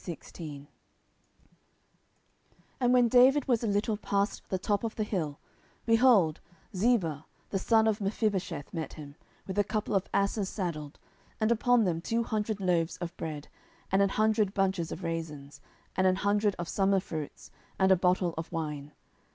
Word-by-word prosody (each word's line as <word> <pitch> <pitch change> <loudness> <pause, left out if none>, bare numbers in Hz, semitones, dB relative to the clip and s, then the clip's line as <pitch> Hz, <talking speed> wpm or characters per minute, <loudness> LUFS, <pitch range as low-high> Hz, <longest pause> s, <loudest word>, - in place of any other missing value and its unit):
10:016:001 155 -4 -8 2.1
And 245 -1 +3
when 250 -1 +5
David 255 +4 +5
was 240 -3 +2
a - - 0
little 205 +1 0
past 200 0 -1
the 190 - 0
top 200 +3 -1
of 225 -1 -3
the 215 - -1
hill, 165 -9 -3 0.5
behold, 225 -9 +4 0.4
Ziba 180 - +1 0.2
the 195 - 0
servant 220 +2 +3
of 215 -1 0
Mephibosheth 195 -7 -2
met 165 -3 -4
him, 145 -2 -10 0.3
with 190 +1 -3
a - - +5
couple 215 +1 -2
of 195 -1 +1
asses 200 0 0
saddled, 155 -7 -4 0.4
and 220 +1 +2
upon 240 0 +3
them 170 -4 0
two 230 +6 0
hundred 215 -1 -2
loaves 175 -3 0
of 175 0 -6
bread, 155 -4 -6 0.4
and 195 +1 +4
an 200 - +3
hundred 215 -1 +1
bunches 190 -4 0
of - - -6
raisins, 155 -4 -5 0.3
and 185 - +3
an 185 - +3
hundred 205 +1 +1
of 175 - -4
summer 195 +1 +2
fruits, 155 -5 -7 0.3
and 190 0 +3
a - - +8
bottle 180 -1 +1
of 160 - -6
wine. 150 -3 -4
195 Hz, 160 wpm, -29 LUFS, 165-215 Hz, 2.1 s, a